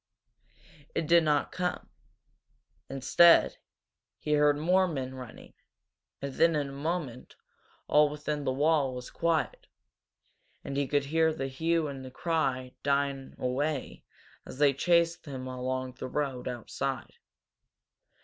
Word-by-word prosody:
It 165 Hz, -, 0 dB
did 170 Hz, +1 st, +5 dB
not 150 Hz, -2 st, +1 dB
come. 180 Hz, -1 st, -3 dB, 1.0 s
Instead, 135 Hz, +6 st, +5 dB, 0.6 s
he 150 Hz, -, -2 dB
heard 145 Hz, -1 st, +4 dB
more 180 Hz, +5 st, +3 dB
men 135 Hz, -6 st, -4 dB
running, 130 Hz, -2 st, -11 dB, 0.7 s
and 140 Hz, -1 st, -3 dB
then 165 Hz, +2 st, +3 dB
in 145 Hz, -2 st, -1 dB
a -, -, -9 dB
moment 145 Hz, -4 st, -4 dB, 0.5 s
all 150 Hz, 0 st, +5 dB
within 150 Hz, 0 st, -4 dB
the 130 Hz, -, 0 dB
wall 145 Hz, -1 st, +2 dB
was 125 Hz, 0 st, -8 dB
quiet, 165 Hz, -2 st, -1 dB, 1.0 s
and 135 Hz, -, -5 dB
he 140 Hz, -1 st, 0 dB
could 145 Hz, +1 st, +1 dB
hear 160 Hz, +2 st, +2 dB
the 135 Hz, -4 st, -3 dB
hue 160 Hz, +4 st, 0 dB
and 135 Hz, -2 st, -7 dB
cry 135 Hz, -5 st, -1 dB
dying 140 Hz, -1 st, -1 dB
away 135 Hz, +3 st, -2 dB, 0.4 s
as -, -, -10 dB
they 145 Hz, -1 st, +4 dB
chased 170 Hz, +3 st, +2 dB
him 130 Hz, -2 st, -6 dB
along 130 Hz, 0 st, -3 dB
the -, -, -4 dB
road 135 Hz, -2 st, -3 dB
outside. 125 Hz, 0 st, -4 dB
145 Hz, 130 wpm, -29 LUFS, 130-160 Hz, 1.0 s, did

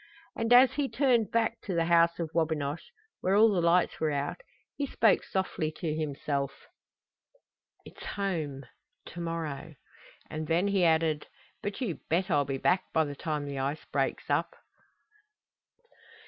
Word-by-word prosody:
And 230 Hz, +1 st, -2 dB
as 250 Hz, +1 st, +8 dB
he 285 Hz, -2 st, -1 dB
turned 245 Hz, -6 st, +2 dB
back 230 Hz, 0 st, 0 dB
to 190 Hz, -, -4 dB
the 165 Hz, -1 st, +2 dB
House 170 Hz, 0 st, +4 dB
of 165 Hz, -2 st, -3 dB
Wabinosh, 160 Hz, -2 st, -1 dB, 0.3 s
where 190 Hz, +2 st, +1 dB
all 220 Hz, +1 st, +6 dB
the 185 Hz, -3 st, +1 dB
lights 170 Hz, +1 st, +2 dB
were 155 Hz, -, +1 dB
out, 145 Hz, -, -2 dB, 0.3 s
he 285 Hz, -, -2 dB
spoke 225 Hz, -5 st, +3 dB
softly 185 Hz, -5 st, -2 dB
to 155 Hz, -1 st, -3 dB
himself: 140 Hz, -2 st, -3 dB, 1.2 s
"It's -, -, -12 dB
home 160 Hz, -9 st, -3 dB, 0.5 s
to 175 Hz, -, -9 dB
morrow!" 165 Hz, -2 st, -4 dB, 0.5 s
And 155 Hz, 0 st, -5 dB
then 175 Hz, +5 st, +2 dB
he 195 Hz, -2 st, +2 dB
added: 160 Hz, -2 st, +2 dB, 0.3 s
"But 205 Hz, +5 st, -4 dB
you 200 Hz, -10 st, -2 dB
bet 180 Hz, +4 st, +1 dB
I'll 145 Hz, -2 st, +3 dB
be 135 Hz, 0 st, -2 dB
back 180 Hz, +7 st, +2 dB
by 160 Hz, -1 st, +2 dB
the 145 Hz, -1 st, -6 dB
time 150 Hz, 0 st, -3 dB
the 140 Hz, -1 st, -4 dB
ice 140 Hz, +3 st, -3 dB
breaks -, -, -1 dB
up!" -, -, 0 dB
165 Hz, 155 wpm, -29 LUFS, 150-195 Hz, 1.2 s, as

